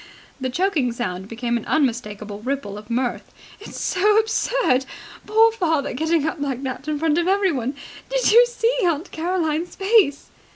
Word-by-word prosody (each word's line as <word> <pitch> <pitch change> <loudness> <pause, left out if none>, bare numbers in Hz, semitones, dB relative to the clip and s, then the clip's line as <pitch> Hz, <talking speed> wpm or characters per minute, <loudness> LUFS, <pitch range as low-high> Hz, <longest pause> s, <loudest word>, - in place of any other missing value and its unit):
The 260 -1 -2
choking 315 -4 0
sound 190 -6 -4
became 235 +2 -2
an 230 - -7
unmistakable 215 -7 -1
ripple 250 -3 -4
of 210 +1 -11
mirth. 245 +1 -2 0.3
"It's 415 - -9
so 415 +3 +2
absurd! 440 - +1 0.4
Poor 445 +2 +5
father 320 - -1
getting 320 +3 0
up 320 +1 -2
like 275 -2 -3
that 260 +2 -5
in 305 -1 -1
front 315 +1 +1
of 345 - 0
everyone! 335 - +1 0.3
Did - - +2
you 470 +3 +8
see 480 0 0
Aunt 340 0 0
Caroline's 335 -1 -2
face?" 390 -8 +2
305 Hz, 160 wpm, -22 LUFS, 250-385 Hz, 0.4 s, you